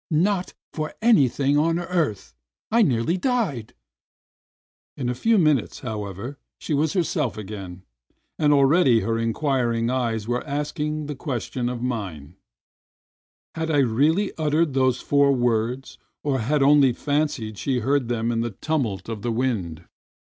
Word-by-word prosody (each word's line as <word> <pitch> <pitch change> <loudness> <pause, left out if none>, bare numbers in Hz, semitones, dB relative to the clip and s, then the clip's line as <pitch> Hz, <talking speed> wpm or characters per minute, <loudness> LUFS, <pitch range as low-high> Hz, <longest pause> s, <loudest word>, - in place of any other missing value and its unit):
"Not 185 +4 0 0.2
for 155 -1 -4
anything 145 - +4
on 165 +2 +2
earth. 165 - -2 0.4
I 230 +2 +4
nearly 140 - +2
died!" 185 - -1 1.2
In 125 -3 -2
a - - 0
few 225 - +2
minutes, 155 - +1
however, 110 +3 -6 0.2
she - - -4
was 150 +4 +1
herself 155 - -1
again, 95 -3 -8 0.6
and 150 -1 +3
already 140 -4 +4
her 115 0 -1
inquiring 120 -1 0
eyes 115 -4 -1
were 120 +1 -1
asking 150 +1 -2
the 150 - -4
ques 130 -4 -3
tion 120 -1 -2
of 125 -1 -5
mine: 90 - -4 1.2
"Had 160 0 -3
I 155 - +2
really 145 - +2
uttered 155 0 +1
those 130 -2 +2
four 140 -1 +3
words, 120 +1 -1 0.2
or 140 -3 0
had 140 +6 0
she - - +5
only 140 -3 +5
fancied 145 -8 -2
she 130 +1 -1
heard 135 +1 +1
them 115 -1 -1
in 115 -1 0
the 120 - -1
tumult 120 -12 -2
of 110 -2 -5
the 120 - -2
wind?" 100 -9 -2
130 Hz, 145 wpm, -23 LUFS, 115-150 Hz, 1.2 s, she